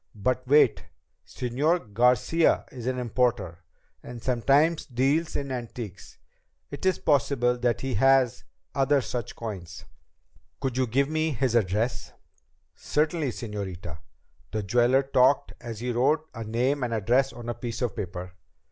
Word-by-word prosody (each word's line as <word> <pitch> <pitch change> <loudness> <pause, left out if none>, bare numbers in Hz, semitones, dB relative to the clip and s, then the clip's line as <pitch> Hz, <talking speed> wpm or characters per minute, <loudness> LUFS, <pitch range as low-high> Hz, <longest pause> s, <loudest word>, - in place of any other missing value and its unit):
"But 130 +5 -1
wait! 145 +3 +4 0.4
Señor 130 - -1
Garcia 125 +8 +3
is 125 -2 -7
an 130 0 -1
importer, 120 -8 0 0.4
and 120 -1 -9
sometimes 140 +7 +2
deals 140 +6 0
in 140 -1 -3
antiques. 115 -6 -7 0.5
It 145 +6 -3
is 185 - +2
possible 135 -4 +2
that 120 -1 0
he 135 -1 -2
has 135 +1 +3 0.3
other 140 +1 +3
such 120 -1 -5
coins." 95 -8 -7 0.7
"Could 135 -3 -2
you 130 0 +1
give 135 +5 +1
me 155 0 0
his 130 -1 0
address?" 110 +2 0 0.6
"Certainly, 155 -1 0
señorita." 95 -8 -6 0.5
The 110 -1 -3
jeweler 120 +6 +3
talked 135 0 +3
as 115 -3 -7
he 125 0 -1
wrote 150 +6 +1
a 115 - -6
name 125 +6 0
and 120 -2 -1
address 125 +6 +2
on 120 -1 -10
a 120 - -1
piece 120 +1 -5
of 120 -5 -2
paper. 90 -2 -5
125 Hz, 140 wpm, -26 LUFS, 115-135 Hz, 0.7 s, wait